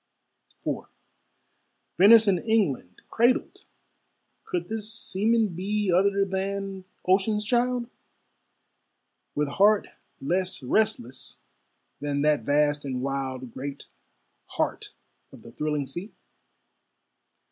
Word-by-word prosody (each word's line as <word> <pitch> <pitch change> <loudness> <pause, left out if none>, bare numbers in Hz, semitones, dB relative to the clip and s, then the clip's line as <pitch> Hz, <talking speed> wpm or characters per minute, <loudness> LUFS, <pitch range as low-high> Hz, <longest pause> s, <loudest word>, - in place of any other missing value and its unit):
IV - - -2 1.1
Venice 220 +3 +8
and 190 -3 +3
England 175 - 0
cradled! 240 +3 +1 0.8
Could 175 -1 -3
this 220 0 -3
seaman 225 0 +1
be 195 +3 -1
Other 195 +2 +3
than 195 0 -3 0.2
ocean's 205 +3 +2
child, 245 +1 +1 1.5
With 150 0 +1
heart 200 +8 +3 0.3
less 180 +1 -1
restless 130 - -1 0.6
than 145 0 -1
that 150 -1 +3
vast 145 0 +2
and 130 -2 -3
wild 130 -2 -3
Great 140 +1 -6 0.7
heart - - -1 0.4
of - - -14
the 115 - -12
thrilling 150 +1 -2
sea? 175 - -7
190 Hz, 95 wpm, -26 LUFS, 145-210 Hz, 1.5 s, Venice